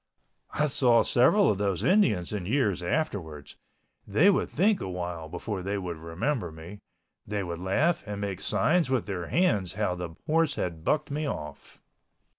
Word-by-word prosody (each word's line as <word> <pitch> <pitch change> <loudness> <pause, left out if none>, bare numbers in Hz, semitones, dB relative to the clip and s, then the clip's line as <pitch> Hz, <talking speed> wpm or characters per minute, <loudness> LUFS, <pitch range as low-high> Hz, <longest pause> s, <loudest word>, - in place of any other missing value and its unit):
I 150 - +2
saw 125 -4 +3
several 195 +12 +4
of 100 - -3
those 100 -3 -1
Indians 115 - +2
in 95 -4 -3
years 110 -7 +1
afterwards. 85 - -3 0.5
They 150 - +5
would 190 - 0
think 205 +2 +2
awhile 90 -3 -5
before 105 +3 -4
they 100 +2 -2
would 90 -4 -4
remember 85 - -2
me—they 90 +4 -9
would 85 -2 -5
laugh 135 - +1
and 105 -1 -4
make 100 -3 -4
signs 155 - +2
with 130 -4 0
their 90 -5 -4
hands 105 - +1
how 100 -2 -1
the 90 -2 -6
horse 160 0 +2
bucked 90 - -1
me 150 +1 -2
off. 75 - -7
100 Hz, 155 wpm, -27 LUFS, 90-140 Hz, 0.5 s, They